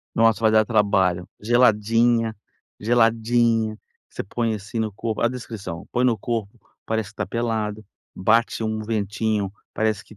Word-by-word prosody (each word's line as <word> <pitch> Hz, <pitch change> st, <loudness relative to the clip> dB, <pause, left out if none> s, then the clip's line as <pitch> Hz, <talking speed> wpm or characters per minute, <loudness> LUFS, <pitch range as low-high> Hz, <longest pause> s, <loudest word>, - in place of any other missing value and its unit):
Nossa, 115 Hz, -2 st, +4 dB
vai 110 Hz, -, +4 dB
dar 110 Hz, 0 st, +5 dB
trabalho. 95 Hz, -5 st, +2 dB
Geladinha, 115 Hz, 0 st, +3 dB, 0.4 s
geladinha. 115 Hz, -1 st, +2 dB, 0.3 s
Você -, -, -5 dB
põe 115 Hz, +2 st, -1 dB
assim 105 Hz, +3 st, -6 dB
no 110 Hz, -2 st, -1 dB
corpo 110 Hz, +2 st, -3 dB
a 115 Hz, -, +3 dB
descrição, 105 Hz, -8 st, -7 dB
põe 125 Hz, +1 st, +1 dB
no 120 Hz, -3 st, +3 dB
corpo, 110 Hz, 0 st, -3 dB, 0.3 s
parece 110 Hz, -2 st, -1 dB
que 105 Hz, -, -15 dB
está -, -, -3 dB
pelado, 110 Hz, -3 st, -2 dB, 0.3 s
bate 115 Hz, +4 st, +2 dB
um 110 Hz, 0 st, -1 dB
ventinho, 105 Hz, -2 st, -1 dB, 0.2 s
parece 110 Hz, -2 st, -1 dB
que 110 Hz, -, -16 dB
110 Hz, 150 wpm, -23 LUFS, 105-115 Hz, 0.4 s, dar